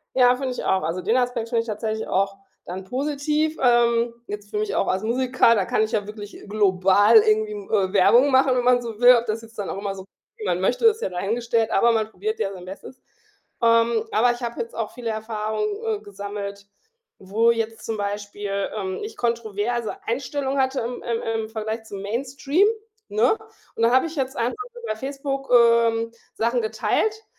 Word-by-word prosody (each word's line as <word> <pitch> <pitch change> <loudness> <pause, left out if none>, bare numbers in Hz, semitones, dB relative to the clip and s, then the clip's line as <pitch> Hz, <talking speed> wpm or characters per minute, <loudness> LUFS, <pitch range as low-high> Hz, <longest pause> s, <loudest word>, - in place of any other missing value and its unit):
Ja, 250 -1 +6
finde 265 0 -3
ich - - -5
auch. 190 0 +1
Also, 165 +3 -2
den 230 - +2
Aspekt 245 -2 -1
finde 235 -1 +1
ich - - -13
tatsächlich 220 0 -3
auch 195 +1 0 0.3
dann 185 +2 -6
positiv. 300 +6 -1
Ähm, 235 -1 +3
jetzt 205 0 -7
für 210 - -2
mich 215 -1 -2
auch - - +1
als 190 +2 0
Musiker, 250 +1 +3
da 200 -4 +1
kann 215 - +1
ich 220 +1 -1
ja 205 -2 0
wirklich 210 -1 -9
global 200 - +4
irgendwie, 430 0 +2 0.2
äh, 190 -2 +1
Werbung 240 +8 +5
machen, 260 0 +4
wenn 245 - +1
man 245 -1 +4
so 230 -3 -7
will, 250 0 +8
ob 235 0 -1
das 220 +1 -2
jetzt 225 -1 -16
dann 200 - -3
auch - - -4
immer 200 -1 -3
so 190 -1 -9 0.3
wie 215 - -8
man 180 -2 0
möchte, 245 - +2
ist 445 0 +3
ja - - 0
dahingestellt. 225 +5 -1
Aber 235 +4 +4
man 220 -1 0
probiert 435 - -4
ja 195 - -1
sein 180 -2 -10
Bestes. 195 +7 -10 0.6
Ähm, 230 -1 +3
aber 240 +3 +4
ich 240 +1 -8
habe 235 0 -4
jetzt 470 +1 -5
auch - - -3
viele 240 -2 -5
Erfahrungen, 220 - -2 0.2
äh, 440 -2 -1
gesammelt, 200 0 -7 0.5
wo 215 +5 +2
jetzt 225 -1 -2
zum 225 - -3
Beispiel, 205 -1 -3
ähm, 190 -3 -3
ich 435 - -8
kontroverse 230 0 -2
Einstellungen 270 +3 -2
hatte 265 +1 +1
im 240 +2 -5
im 230 -1 -2 0.2
im 220 - -8
Vergleich 220 0 -4
zum 200 -2 -8
Mainstream, 275 - 0 0.4
ne? 230 - +2 0.4
Und - - -2
da 230 - +5
habe 260 +5 +4
ich 330 - -7
jetzt 265 -2 -2
einfach 235 +1 0 0.3
bei - - -1
Facebook, 275 +1 -4
ähm, 230 -1 +4 0.2
Sachen 235 +1 0
geteilt, 435 - -1
230 Hz, 195 wpm, -23 LUFS, 205-250 Hz, 0.6 s, will